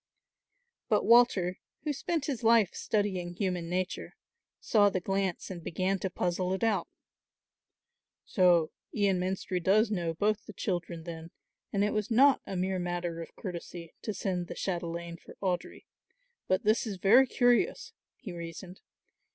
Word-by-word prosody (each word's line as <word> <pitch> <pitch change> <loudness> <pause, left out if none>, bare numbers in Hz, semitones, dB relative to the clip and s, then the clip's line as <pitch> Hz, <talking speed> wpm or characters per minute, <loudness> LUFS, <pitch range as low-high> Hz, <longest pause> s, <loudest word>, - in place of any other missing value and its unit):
But - - +2
Walter, 205 -7 +4 0.2
who 300 -1 -1
spent 305 +2 -2
his 270 -6 -3
life 225 -4 +4
studying 190 -5 -1
human 180 -4 -2
nature, 180 +1 -3 0.4
saw 205 -2 +4
the 190 - -1
glance 195 0 -2
and 175 -3 -7
began 185 +4 -1
to 190 - -2
puzzle 180 +1 -1
it 190 - -3
out. 210 -6 +1 1.4
"So 175 -4 +3 0.2
Ian 200 -3 +1
Menstrie 185 0 -2
does 215 +4 +4
know 170 -5 -1
both 215 +4 0
the 215 - -8
children 175 -4 -3
then 165 -1 -8 0.4
and 200 0 +1
it 210 - +1
was 215 -1 -1
not 270 +4 +5
a 195 - -4
mere 185 +1 -1
matter 175 -1 -3
of 165 - -10
courtesy 175 -3 -7
to 215 - -3
send 180 -4 -2
the - - -7
chatelaine 170 -2 -4
for - - -14
Audry. 185 -3 -3 0.6
But 185 +4 +1
this 220 +2 +2
is 200 -3 -4
very 230 +9 +6
curious," 245 - +2 0.2
he 220 -8 -8
reasoned. 170 +2 -8
185 Hz, 150 wpm, -30 LUFS, 175-215 Hz, 1.4 s, very